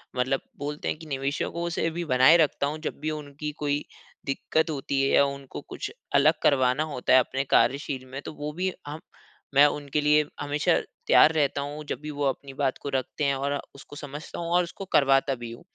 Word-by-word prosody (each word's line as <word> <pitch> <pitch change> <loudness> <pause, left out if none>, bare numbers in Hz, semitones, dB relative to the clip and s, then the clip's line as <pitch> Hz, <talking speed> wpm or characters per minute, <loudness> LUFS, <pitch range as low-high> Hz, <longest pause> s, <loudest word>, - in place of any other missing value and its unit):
मतलब 130 +2 0 0.2
बोलते 145 +1 -4
हैं - - -1
कि 160 - -12
निवेशकों 140 +5 -2
से 165 - +1
भी 170 +2 -4
बनाए 130 +2 +6
रखता 150 -3 +2
हूँ 150 +2 -3
जब 155 - -5
भी 155 +2 -2
उनकी 150 0 -6
कोई 145 0 0 0.4
दिक़्क़त 140 +4 0
होती 140 -2 -1
है 135 - +2
या - - +6
उनको 140 -1 -6
कुछ - - -7 0.2
अलग 145 +3 +6
करवाना 130 0 +3
होता 145 -5 -1
है 130 - +9
अपने 135 +2 -1
कार्यशील 135 0 +2
में 135 +2 -7
तो - - -8
वो 150 0 -5
भी 185 +3 -1 0.2
हम 150 +2 -6 0.5
मैं 140 +1 +7
उनके 145 0 -1
लिए 150 +1 +4
हमेशा 145 0 +1 0.3
तैयार 155 - +7
रहता 145 -2 +1
हूँ 145 +2 -6
जब - - -3
भी 155 - -6
वो 145 0 -4
अपनी 135 0 -3
बात 135 -1 -1
को 140 - -4
रखते 135 +2 -2
हैं 140 -1 +2
और 140 +1 -1 0.2
उसको 140 +1 -12
समझता 145 +1 -8
हूँ 170 -1 -4
और 180 0 +4
उसको 180 +3 -8
करवाता 135 0 +4
भी 120 -2 -8
हूँ। 115 - -11
145 Hz, 210 wpm, -26 LUFS, 135-150 Hz, 0.5 s, है